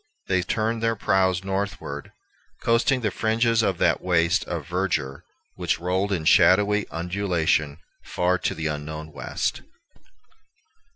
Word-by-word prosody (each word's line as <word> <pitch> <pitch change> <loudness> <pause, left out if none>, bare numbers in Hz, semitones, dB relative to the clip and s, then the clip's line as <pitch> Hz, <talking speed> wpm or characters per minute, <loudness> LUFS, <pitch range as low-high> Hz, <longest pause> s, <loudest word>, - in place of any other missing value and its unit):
They 95 -1 +1
turned 110 +4 -1
their 115 0 +1
prows 95 -2 +1
northward, 95 -7 -4 0.5
coasting 120 +3 +2
the 105 -3 0
fringes 115 +2 +1
of 95 -5 0
that - - +2
waste 85 +2 +2
of 85 -4 -4
verdure 85 -6 -2 0.3
which - - -1
rolled 95 +3 -1
in 85 -5 -1
shadowy 105 +5 +4
undulation 85 -4 0 0.3
far 90 +1 0
to - - -2
the 80 - -5
unknown 75 +1 -4
West. - - -3
95 Hz, 125 wpm, -24 LUFS, 85-105 Hz, 0.5 s, shadowy